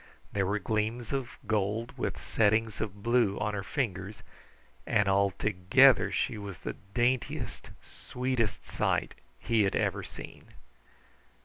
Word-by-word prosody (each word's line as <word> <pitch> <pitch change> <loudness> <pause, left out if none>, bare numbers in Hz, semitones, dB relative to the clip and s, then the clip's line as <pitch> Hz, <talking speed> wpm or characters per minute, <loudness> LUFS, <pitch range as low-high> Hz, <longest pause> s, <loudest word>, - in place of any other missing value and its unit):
There 100 -2 +1
were 105 +2 +1
gleams 110 +3 -2
of 130 -3 -3
gold 110 +2 -1
with - - -3
settings 110 0 +1
of 100 -2 -5
blue 120 -4 +3
on 105 0 -1
her 100 - -2
fingers, 100 -4 -3 0.6
and 105 - +3
altogether 100 +6 +4
she 115 -4 -1
was 100 -3 -7
the - - -5 0.2
daintiest, 120 -1 -1
sweetest 125 -3 -2
sight - - 0 0.2
he 115 -2 +2
ever - - 0
had - - -9
seen. - - -10
105 Hz, 125 wpm, -30 LUFS, 100-120 Hz, 0.6 s, altogether